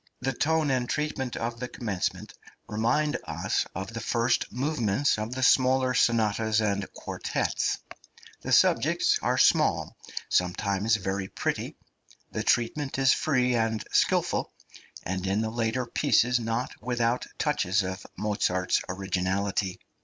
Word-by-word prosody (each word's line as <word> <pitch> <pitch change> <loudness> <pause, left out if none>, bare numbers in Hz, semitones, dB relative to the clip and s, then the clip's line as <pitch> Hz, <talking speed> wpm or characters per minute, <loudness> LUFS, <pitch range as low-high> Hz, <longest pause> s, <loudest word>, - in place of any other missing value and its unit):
The 135 +1 -1
tone 155 0 +1
and 125 -2 0
treatment 145 -4 -2
of 115 0 -3
the 125 - -3
commencement 105 -7 -3 0.3
remind 120 +8 0
us - - -1
of 95 +4 -5
the 115 - -4
first 115 +2 0
movements 130 -3 0
of 110 +4 -4
the 130 - -2
smaller 130 0 +4
sonatas 110 -2 +2
and 100 -2 -1
quartets; - - -2 0.6
the - - -5
subjects - - +3
are - - +1
small, - - +3 0.3
sometimes 100 +4 +1
very 95 -1 -2
pretty'; - - -3 0.6
the - - -2
treatment 135 +4 0
is 135 0 +5
free 125 -5 +1
and 115 -2 0
skilful, - - +1 0.5
and 95 +1 -3
in 100 +3 +1
the 110 0 -2
later 120 +2 -1
pieces 120 +1 +2
not 115 +2 -2
without 120 0 0
touches 95 +3 +1
of 95 0 -5
Mozart's 95 -3 0
originality. 95 0 -1
115 Hz, 130 wpm, -27 LUFS, 100-125 Hz, 0.6 s, is